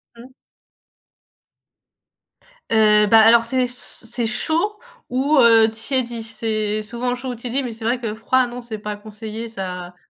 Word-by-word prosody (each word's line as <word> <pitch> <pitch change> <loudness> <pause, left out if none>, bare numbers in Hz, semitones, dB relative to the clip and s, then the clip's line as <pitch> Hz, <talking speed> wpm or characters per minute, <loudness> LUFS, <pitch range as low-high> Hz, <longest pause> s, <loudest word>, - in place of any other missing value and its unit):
Mmh. 240 +3 -13 2.4
Heu, 210 -1 +4
bah 225 +2 +6
alors 230 +1 +6
c'est 255 +2 0
c 245 -1 -6
c'est 235 +1 -3
chaud 330 - -1 0.3
ou, 275 +4 +1
heu, 225 -2 +6
tiédi. 235 +1 -2
C'est 215 -2 -2
souvent 240 +3 -3
chaud 255 +1 -7
ou 250 - -4
tiédi, 245 +3 -2
mais 245 - -4
c'est 225 0 -9
vrai 240 +2 +1
que 220 -2 -3
froid 250 +4 +1
non, 245 +1 -8
c'est 235 -2 -7
pas 210 0 -5
conseillé, 220 +2 -8
ça.. 180 -4 -6
230 Hz, 155 wpm, -21 LUFS, 215-250 Hz, 2.4 s, bah